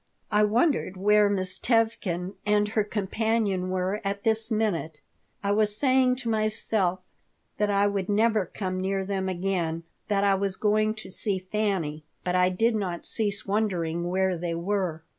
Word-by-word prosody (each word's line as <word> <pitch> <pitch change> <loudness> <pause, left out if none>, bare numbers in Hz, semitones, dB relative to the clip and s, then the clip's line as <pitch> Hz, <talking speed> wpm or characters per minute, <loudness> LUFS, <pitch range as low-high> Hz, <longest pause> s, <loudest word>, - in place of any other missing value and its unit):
I 210 0 +4
wondered 225 - +1
where 210 +2 +4
Miss 185 -1 -1
Tevkin 210 -6 0
and 210 0 +2
her 215 0 +1
companion 205 -2 -1
were 185 +3 -1
at 200 0 -3
this 220 0 +1
minute. 200 -9 -1 0.4
I 200 - +1
was 210 0 +2
saying 260 -1 +3
to 250 -2 -7
myself 215 -4 +1 0.6
that 210 0 +2
I 200 0 +3
would 200 -2 -1
never 215 -2 +2
come 185 -1 -4
near 190 0 -1
them 190 -1 -2
again, 175 -3 -2 0.2
that 200 -1 +1
I 200 -1 +4
was 195 0 -1
going 215 +1 +1
to 215 - -10
see 195 +1 -1
Fanny; 185 -6 -2 0.2
but 180 0 -1
I 180 0 +4
did 225 +6 +1
not 185 -5 -3
cease 205 -2 0
wondering 175 -5 -1
where 190 0 +1
they 170 0 -3
were. 175 -2 -2
200 Hz, 160 wpm, -26 LUFS, 185-215 Hz, 0.6 s, I